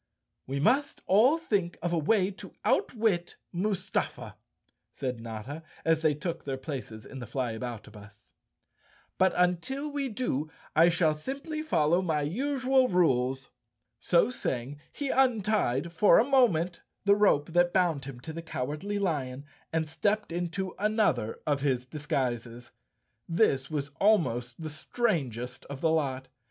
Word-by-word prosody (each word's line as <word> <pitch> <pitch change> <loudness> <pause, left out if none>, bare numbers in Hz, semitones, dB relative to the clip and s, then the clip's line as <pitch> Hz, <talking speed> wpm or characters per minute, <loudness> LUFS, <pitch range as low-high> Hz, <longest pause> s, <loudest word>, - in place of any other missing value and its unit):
"We 135 +1 -2
must 270 - +1
all 235 - +5
think 200 - -1
of 175 0 0
a - - +2
way 190 +4 +2
to 195 - -11
outwit 215 - +1 0.2
Mustafa," 190 +1 -2 0.6
said 125 -3 -4
Notta, 115 +7 -6 0.2
as 165 -1 +3
they 155 -2 +3
took 165 +2 -4
their 135 -1 -3
places 130 -6 -6
in 135 - -9
the 120 - -7
Flyabouta 120 -3 -4
bus. 105 0 -15 0.4
" - - -34
But 190 0 +5
until 180 - 0
we 280 -2 -2
do 180 - -2 0.3
I 165 +2 +7
shall 165 -2 +3
simply 275 - -5
follow 170 - +2
my 160 -5 0
usual 260 - +2
rules." 135 - +1 0.5
So 180 +7 +3
saying, 135 - -3
he 285 -2 -4
untied, 210 - +1
for 185 +1 +6
a 225 - +5
moment, 200 - +3 0.2
the 200 - +6
rope 170 -7 +3
that 175 0 +4
bound 170 -7 +1
him 135 -3 -8
to 160 - -7
the 165 - -5
Cowardly 160 +6 -3
Lion 140 -8 -2 0.3
and 160 -1 0
stepped 205 +6 0
into 175 +2 -3
another 205 - +1
of 145 -2 +1
his 130 -3 0
disguises. 125 -4 -3 0.6
This 140 -7 +2
was 145 -2 -3
almost 130 - +2
the 155 - -4
strangest 145 - -2
of 140 -1 -7
the 160 +1 +2
lot. 135 -4 -1
165 Hz, 145 wpm, -29 LUFS, 135-205 Hz, 0.6 s, I